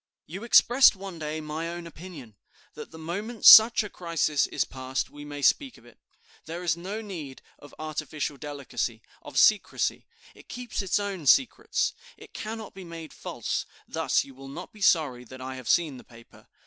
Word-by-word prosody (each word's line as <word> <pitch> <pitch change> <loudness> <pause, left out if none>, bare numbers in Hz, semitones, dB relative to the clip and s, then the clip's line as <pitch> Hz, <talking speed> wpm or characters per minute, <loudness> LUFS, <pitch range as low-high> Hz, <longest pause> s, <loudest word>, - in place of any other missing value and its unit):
You 190 +7 -8
expressed 240 +1 +6
one 190 -3 -8
day 155 0 -4
my 155 +2 -4
own 175 0 -7
opinion, 160 - -11 0.4
that - - -9
the 160 - -12
moment 200 +8 -5
such 220 +1 +10
a - - -5
crisis 165 -6 0
is - - -1
passed, 130 0 -4
we 145 0 -10
may 145 -1 -7
speak 270 - +2
of - - -20
it. - - -19 0.5
There 170 +2 -6
is 170 -3 +1
no 195 +6 -6
need 165 -11 -8 0.2
of 145 - -15
artificial 155 -1 -4
delicacy, 135 -6 -4 0.2
of - - -9
secrecy; - - +2 0.3
it - - -18
keeps 245 -3 -4
its 195 0 0
own 200 -7 -4
secrets; 265 - +3 0.2
it - - -15
cannot 220 -1 -6
be 190 - -10
made 165 -2 -9
false. - - -4 0.2
Thus - - +1
you 135 - -14
will 135 +1 -12
not 160 +7 -9
be 215 - -15
sorry 145 -10 +2
that 130 +2 -12
I 130 +1 -6
have 130 -2 -8
seen 155 -6 +2
the - - -13
paper. 115 -1 -18
160 Hz, 185 wpm, -27 LUFS, 140-195 Hz, 0.5 s, such